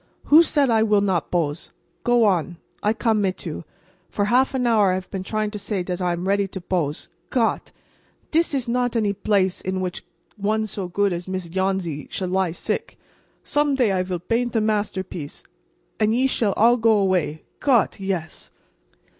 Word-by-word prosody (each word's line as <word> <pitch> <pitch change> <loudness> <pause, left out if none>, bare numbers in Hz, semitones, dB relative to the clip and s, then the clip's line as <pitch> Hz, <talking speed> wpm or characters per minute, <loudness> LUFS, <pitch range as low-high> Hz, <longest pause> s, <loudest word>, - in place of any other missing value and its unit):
"Who 310 +3 +7
said 290 -6 +2
I 225 -1 +4
will 210 -2 +3
not 185 -5 0
bose? 165 -3 -1 0.3
Go 240 -1 +4
on. 175 -3 +1 0.2
I 210 - +2
come 220 -1 +1
mit 190 -1 -2
you. 165 0 -5 0.4
For 205 - -1
half 255 +5 +2
an 250 -1 0
hour 215 -4 +4
I - - +2
haf 185 0 -6
peen 195 - -3
trying 215 +2 -2
to 210 - -5
say 200 -2 -2
dot 180 0 -4
I 180 -1 +1
am 175 +2 -4
ready 200 0 +2
to 190 - -7
bose. 170 -5 -2 0.2
Gott! 235 -4 0 0.6
dis 325 -2 +2
is 260 -3 -2
not 245 0 0
any 215 -3 +2
blace 195 -2 0
in 185 0 -2
which 180 -1 -4 0.3
one 215 +2 0
so 195 -3 -5
goot 200 +2 +1
as 175 +1 -5
Miss 185 -2 -4
Yohnsy 190 -4 -2
shall 185 -2 -3
lie 190 -1 +1
sick. 165 - -4 0.5
Some 290 -1 +1
day 245 -6 +2
I 185 -1 +1
vill 185 -1 -3
baint 235 +7 -1
a - - +4
masterpiece, 190 -7 -3 0.6
and 215 -1 +3
ve 255 +3 +2
shall 225 -6 +1
all 235 +3 +4
go 225 -2 +4
away. 185 -6 0 0.2
Gott! 245 -9 +2
yes." 185 -5 -4
200 Hz, 190 wpm, -23 LUFS, 185-225 Hz, 0.6 s, Who